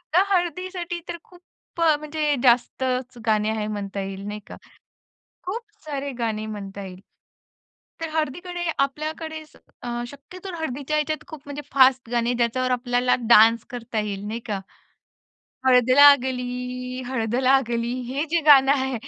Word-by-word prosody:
तर 370 - +6
हळदीसाठी 355 0 -2
तर 340 - -4
खूप 355 -1 -19 0.4
अ, 320 -2 +5
म्हणजे 300 -1 -1
जास्तच 250 +1 +1
गाणी 215 0 +2
आहेत 215 -1 -2
म्हणता 200 -1 -4
येईल, 195 0 -6
नाही 210 0 -5
का. - - -10 0.9
खूप 435 +6 -4 0.2
सारे 285 -2 -4
गाणे 215 -1 -2
म्हणता 200 -2 -7
येईल. 185 -1 -10 1.0
तर 325 - -3
हळदीकडे 350 +4 -3
आपल्याकडे 310 +3 -2 0.4
अ, - - -5 0.2
शक्यतो 360 +7 -10
हळदीच्या 290 0 -2
ह्याच्यात 305 +1 -2
खूप 305 -3 -10
म्हणजे 290 +1 -6
फास्ट 260 -3 +4
गाणे, 240 0 +1
ज्याच्यावर 245 +2 0
आपल्याला 245 0 +1
डान्स 230 0 +6
करता 235 -2 -3
येईल, 205 -1 -4
नाही 230 +2 -4
का? 205 -2 -2 1.1
हळद 250 -1 +5
लागली, 250 -2 +3
हळद 230 -3 -1
लागली 245 -2 +2 0.2
हे 270 +4 -1
जे 340 +1 +2
गाणं 275 -2 +8
आहे, 265 -2 0
255 Hz, 140 wpm, -24 LUFS, 235-300 Hz, 1.1 s, गाणं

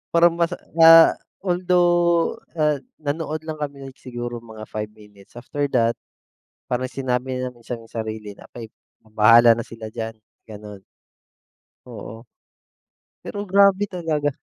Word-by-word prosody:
Parang 170 0 +6
mas, 170 +1 +1 0.2
ah, 165 0 +9 0.3
although, 175 -2 +2 0.2
ah, 150 -2 +1 0.2
nanood 155 +1 -3
lang 155 -1 -6
kami 140 -2 -6
like - - -29
siguro 120 -1 -6
mga 110 -2 -11
5 105 0 -5
minutes, 105 -1 -19
after 140 +4 -3
that 115 -1 +3 0.8
parang 130 +1 -1
sinabi 130 -1 -3
namin 125 -2 -8
sa 120 - -4
sarili 110 -2 -6
na - - -15
like 115 -2 -9 0.4
bahala 115 +2 +6
na 115 - -4
sila 110 -1 -9
diyan, 110 0 -5 0.3
gano'n. 105 -2 -10 1.1
Oo. 115 0 -10 1.0
Pero 205 - -5
grabe 200 +1 +3
talaga. 160 -6 -1
130 Hz, 130 wpm, -22 LUFS, 115-165 Hz, 1.1 s, ah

